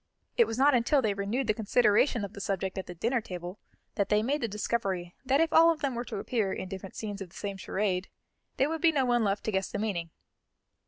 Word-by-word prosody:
It 470 Hz, -, +5 dB
was 225 Hz, -, -3 dB
not 280 Hz, +2 st, +5 dB
until 255 Hz, +3 st, +3 dB
they 210 Hz, -2 st, +2 dB
renewed 200 Hz, +7 st, -1 dB
the 215 Hz, -, +2 dB
consideration 220 Hz, +1 st, +3 dB
of 200 Hz, -, -10 dB
the 200 Hz, -, -7 dB
subject 190 Hz, -1 st, -2 dB
at 190 Hz, -, -6 dB
the 180 Hz, -, -7 dB
dinner 235 Hz, +7 st, 0 dB
table 180 Hz, -1 st, -7 dB, 0.3 s
that 200 Hz, -, -1 dB
they 210 Hz, 0 st, +3 dB
made 285 Hz, +5 st, 0 dB
the 230 Hz, -, 0 dB
discovery 195 Hz, -4 st, -2 dB
that 270 Hz, +2 st, +2 dB
if 325 Hz, 0 st, +2 dB
all 330 Hz, +1 st, +7 dB
of 330 Hz, -2 st, 0 dB
them 275 Hz, -3 st, 0 dB
were 240 Hz, 0 st, -3 dB
to -, -, -5 dB
appear 205 Hz, -1 st, -1 dB
in 185 Hz, -, -4 dB
different 190 Hz, 0 st, -8 dB
scenes 205 Hz, -2 st, -5 dB
of 190 Hz, -, -6 dB
the -, -, -20 dB
same 200 Hz, -1 st, -4 dB
charade, 190 Hz, -1 st, -1 dB, 0.5 s
there 270 Hz, -, +3 dB
would 320 Hz, +1 st, -3 dB
be 335 Hz, -2 st, +5 dB
no 275 Hz, -4 st, +1 dB
one 240 Hz, -2 st, +2 dB
left 200 Hz, 0 st, 0 dB
to 220 Hz, -, -1 dB
guess 190 Hz, -1 st, -1 dB
the -, -, -4 dB
meaning. 195 Hz, -6 st, -2 dB
210 Hz, 250 wpm, -29 LUFS, 195-255 Hz, 0.5 s, all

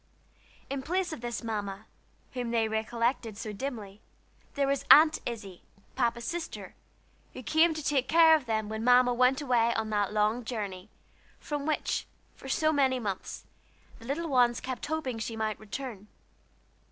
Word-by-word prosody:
In 275 Hz, 0 st, -3 dB
place 355 Hz, +4 st, -1 dB
of 275 Hz, -, -8 dB
this 240 Hz, -1 st, -4 dB
Mamma, 205 Hz, -2 st, -4 dB, 0.5 s
whom 245 Hz, -2 st, -3 dB
they 230 Hz, -1 st, +1 dB
recollected 225 Hz, 0 st, -1 dB
so 215 Hz, -1 st, -5 dB
dimly, 215 Hz, -4 st, -6 dB, 0.5 s
there 280 Hz, -1 st, +2 dB
was 275 Hz, 0 st, 0 dB
Aunt 310 Hz, +1 st, +8 dB
Izzie, 210 Hz, -6 st, -7 dB, 0.3 s
Papa's 235 Hz, -2 st, 0 dB
sister, 345 Hz, -1 st, -5 dB, 0.6 s
who 255 Hz, -, -8 dB
came 320 Hz, +4 st, +3 dB
to 310 Hz, -, -5 dB
take 270 Hz, -3 st, +1 dB
care 325 Hz, -1 st, +7 dB
of 290 Hz, -6 st, -3 dB
them 220 Hz, -1 st, -1 dB
when 220 Hz, +1 st, -4 dB
Mamma 245 Hz, 0 st, +5 dB
went 255 Hz, +3 st, +3 dB
away 235 Hz, -4 st, +2 dB
on 220 Hz, -1 st, -2 dB
that 205 Hz, -1 st, 0 dB
long 215 Hz, +3 st, +1 dB
journey, 205 Hz, -4 st, -5 dB, 0.5 s
from 295 Hz, -1 st, -4 dB
which, 310 Hz, -, -1 dB, 0.3 s
for 270 Hz, -, -10 dB
so 310 Hz, +3 st, +2 dB
many 265 Hz, -3 st, +2 dB
months, 200 Hz, -5 st, -5 dB, 0.5 s
the 230 Hz, -, -13 dB
little 305 Hz, +6 st, -2 dB
ones 245 Hz, -4 st, +3 dB
kept 260 Hz, +1 st, -5 dB
hoping 285 Hz, -7 st, -3 dB
she 225 Hz, +1 st, -4 dB
might 220 Hz, -1 st, -2 dB
return. 215 Hz, -1 st, -7 dB
240 Hz, 160 wpm, -29 LUFS, 220-275 Hz, 0.6 s, Aunt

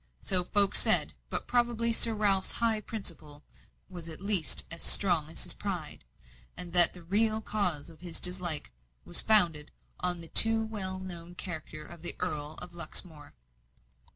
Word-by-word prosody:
So 180 Hz, -, 0 dB
folk 200 Hz, +1 st, +3 dB
said; -, -, +4 dB, 0.2 s
but -, -, -5 dB
probably 235 Hz, -1 st, -2 dB
Sir 230 Hz, 0 st, +1 dB
Ralph's 200 Hz, -3 st, 0 dB
high 225 Hz, -2 st, -2 dB
principle 160 Hz, -9 st, -8 dB, 0.4 s
was 175 Hz, -3 st, -11 dB
at 160 Hz, -, -10 dB
least 195 Hz, -4 st, +2 dB
as 165 Hz, -, -2 dB
strong 170 Hz, -6 st, +2 dB
as 160 Hz, -, -8 dB
his 175 Hz, -, -3 dB
pride, 175 Hz, -, -8 dB, 0.5 s
and 175 Hz, -1 st, -8 dB
that 175 Hz, -1 st, +7 dB
the 180 Hz, -, -14 dB
real 215 Hz, +5 st, 0 dB
cause 180 Hz, -9 st, -3 dB
of 160 Hz, -1 st, -16 dB
his 175 Hz, -2 st, -6 dB
dislike 180 Hz, -, 0 dB, 0.3 s
was 85 Hz, -, +3 dB
founded 170 Hz, -9 st, +3 dB, 0.3 s
on 180 Hz, -1 st, -3 dB
the 165 Hz, -, -12 dB
too 225 Hz, 0 st, +8 dB
well 195 Hz, -4 st, -6 dB
known 175 Hz, -2 st, -11 dB
character 155 Hz, -4 st, -7 dB
of 170 Hz, -2 st, -15 dB
the 175 Hz, -, -1 dB
Earl 150 Hz, 0 st, -5 dB
of 180 Hz, -1 st, -11 dB
Luxmore. 165 Hz, -3 st, -4 dB
180 Hz, 160 wpm, -27 LUFS, 165-205 Hz, 0.5 s, too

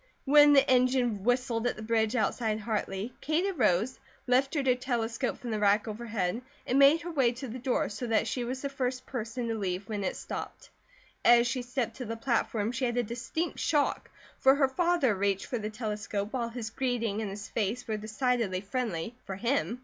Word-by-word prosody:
When 290 Hz, +1 st, +7 dB
the 275 Hz, 0 st, +5 dB
engine 250 Hz, -5 st, +2 dB
whistled 245 Hz, 0 st, +1 dB
at -, -, -1 dB
the 215 Hz, -, -8 dB
bridge 220 Hz, +1 st, +1 dB
outside 220 Hz, -1 st, 0 dB
Hartley 210 Hz, 0 st, -3 dB
Kate 315 Hz, +5 st, +1 dB
arose, 255 Hz, -, +1 dB, 0.3 s
lifted 270 Hz, +3 st, +2 dB
her 255 Hz, -, +5 dB
telescope 245 Hz, -1 st, -2 dB
from 240 Hz, -, -6 dB
the 215 Hz, -, -1 dB
rack 205 Hz, +2 st, +3 dB
overhead, 215 Hz, -2 st, -2 dB, 0.2 s
and 260 Hz, -, +2 dB
made 285 Hz, +4 st, +7 dB
her 345 Hz, -, -5 dB
way 260 Hz, -6 st, +2 dB
to 260 Hz, +3 st, -7 dB
the 250 Hz, +2 st, -6 dB
door, 250 Hz, 0 st, 0 dB
so 240 Hz, +4 st, -5 dB
that 225 Hz, 0 st, +2 dB
she 245 Hz, +3 st, -2 dB
was 255 Hz, +3 st, -4 dB
the -, -, 0 dB
first 255 Hz, -1 st, -3 dB
person 235 Hz, -1 st, -4 dB
to 225 Hz, -, -1 dB
leave 190 Hz, -4 st, -2 dB
the -, -, -24 dB
car -, -, -5 dB
when 205 Hz, -2 st, -2 dB
it 190 Hz, -, -1 dB
stopped. -, -, -7 dB, 0.5 s
As 240 Hz, 0 st, +6 dB
she 250 Hz, +1 st, -1 dB
stepped 245 Hz, -1 st, -3 dB
to 250 Hz, -, -5 dB
the 230 Hz, +1 st, -4 dB
platform 225 Hz, -2 st, 0 dB
she 255 Hz, +1 st, -1 dB
had 240 Hz, 0 st, -1 dB
a 245 Hz, -, +3 dB
distinct 235 Hz, +9 st, -3 dB
shock, 295 Hz, -3 st, +1 dB, 0.3 s
for 265 Hz, +1 st, +6 dB
her 280 Hz, -1 st, +3 dB
father 340 Hz, -5 st, +2 dB
reached 195 Hz, 0 st, 0 dB
for 245 Hz, -4 st, -3 dB
the 215 Hz, 0 st, -3 dB
telescope, 210 Hz, -2 st, -4 dB
while 240 Hz, -3 st, -1 dB
his 230 Hz, -2 st, -5 dB
greeting 230 Hz, -5 st, -1 dB
and 210 Hz, -, -3 dB
his 205 Hz, +1 st, -7 dB
face 225 Hz, +3 st, -2 dB
were 220 Hz, -, -1 dB
decidedly 220 Hz, -2 st, -1 dB
friendly, 210 Hz, -2 st, -3 dB
for 190 Hz, -, -5 dB
him. 230 Hz, -, -1 dB
235 Hz, 205 wpm, -29 LUFS, 215-255 Hz, 0.5 s, When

